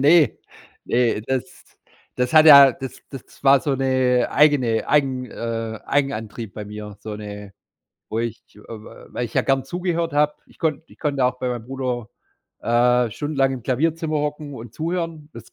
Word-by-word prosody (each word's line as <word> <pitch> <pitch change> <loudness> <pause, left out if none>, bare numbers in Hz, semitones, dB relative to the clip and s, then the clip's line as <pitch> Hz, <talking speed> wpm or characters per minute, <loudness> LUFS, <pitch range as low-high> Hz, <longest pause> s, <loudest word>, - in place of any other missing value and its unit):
Ne. 150 -2 +5 0.5
Ne, 120 -3 +1
das 130 +1 -4 0.5
das 125 +2 -1
hat 155 0 +8
ja 140 -3 +10
das 130 +1 -8
das 135 -1 -12
war 135 0 +6
so 145 -3 -1
'ne 130 -1 +1
eigene 135 -6 +3
eigen 135 -3 +1
äh, 115 -1 -4
Eigenantrieb 115 -6 -2
bei 105 - -6
mir, 105 0 -8
so 110 0 -6
'ne 105 -1 -9 0.6
wo 110 - -3
ich, 115 -2 -4 0.2
äh, - - -14
weil 115 +2 -7
ich 120 - -8
ja - - +3
gern 135 -1 +1
zugehört 170 +1 -2
hab. 150 0 +1
Ich - - -23
konnte 160 -1 -1
ich - - -20
konnte 145 -3 -2
ja 125 - +4
auch 125 0 -7
bei 125 - -2
meinem 120 -2 -4
Bruder, 125 -4 -4 0.5
äh, 120 0 +2
stundenlang 135 0 0
im 125 -3 -6
Klavierzimmer 155 +5 0
hocken 150 -1 -4
und 115 -1 -10
zuhören. 165 -2 -3
Das - - -13
130 Hz, 175 wpm, -22 LUFS, 115-150 Hz, 0.6 s, ja